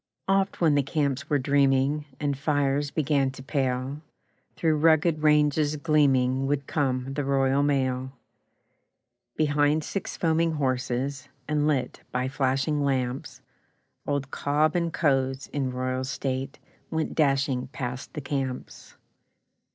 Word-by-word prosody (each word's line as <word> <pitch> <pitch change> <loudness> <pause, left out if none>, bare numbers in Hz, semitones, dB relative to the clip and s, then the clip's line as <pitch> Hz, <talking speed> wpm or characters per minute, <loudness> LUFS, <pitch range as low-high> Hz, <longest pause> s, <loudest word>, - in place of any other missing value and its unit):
Oft 195 0 +1
when 160 -4 +4
the 145 - +4
camps 140 -1 -1
were 145 - +3
dreaming, 140 +1 +2
And 145 -2 0
fires 145 0 0
began 140 -3 +1
to 130 - -10
pale, 135 0 -2 0.5
Through 160 -2 +1
rugged 160 0 +3
ranges 150 0 +3
gleaming 135 -4 +2
Would 140 -1 -1
come 135 -3 -1
the 145 +1 -2
Royal 135 0 +2
Mail. 130 -2 0 1.2
Behind 150 0 +2
six 195 - -4
foaming 165 0 +1
horses, 135 0 -2 0.2
And 150 0 +1
lit 130 -5 -1
by 125 +1 -1
flashing 135 +1 0
lamps, 130 -2 -2 0.7
Old 140 -2 -2
'Cobb 150 +2 +1
and 170 -1 0
Co.'s', 135 -4 +1
in 135 -3 -1
royal 130 0 -2
state, 135 0 -3 0.3
Went 160 -1 -2
dashing 135 -4 +1
past 125 -1 -6
the 150 - -3
camps. 135 -2 -5
140 Hz, 125 wpm, -26 LUFS, 130-150 Hz, 1.2 s, when